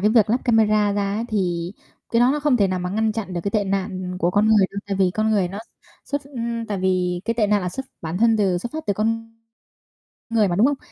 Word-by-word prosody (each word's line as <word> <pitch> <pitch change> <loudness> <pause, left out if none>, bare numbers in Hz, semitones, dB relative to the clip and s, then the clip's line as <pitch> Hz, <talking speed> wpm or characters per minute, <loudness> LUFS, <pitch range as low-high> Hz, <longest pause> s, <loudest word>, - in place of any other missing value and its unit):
cái 210 +3 +3
việc 220 -2 +4
lắp 245 - +2
camera 215 -3 +3
ra 200 0 -1
ấy, 225 +2 -2
thì 175 -4 -1 0.4
cái 230 - +2
đó 245 +2 +5
nó 295 - -1
không 290 -4 +3
thể 200 -3 +3
nào 185 -1 -1
mà 180 0 -3
ngăn 220 +2 0
chặn 215 -4 -5
được 175 - -2
cái 200 - 0
tệ 205 -1 +1
nạn 185 -2 -3
của 175 0 +1
con 205 +3 +2
người 210 -3 +5
đâu, 200 - -5
tại 195 -1 -2
vì 190 -2 +3
con 220 0 +1
người 195 -4 +2
nó 195 - -7 0.5
xuất 285 0 -3
ưm, 235 -4 -4
tại 205 -2 -3
vì 180 -1 0
cái 230 +1 -1
tệ 220 -3 +2
nạn 205 0 +2
là 180 - -2
xuất 265 +9 -6 0.2
bản 165 +2 -3
thân 225 0 +4
từ 190 -4 +1
xuất 235 +7 -6
phát 315 -3 -6
từ 205 - +2
con 225 +2 -2 1.0
người 225 -3 +3
mà, 175 - -1
đúng 210 - +4
không? 285 -1 0
210 Hz, 270 wpm, -22 LUFS, 185-225 Hz, 1.0 s, đó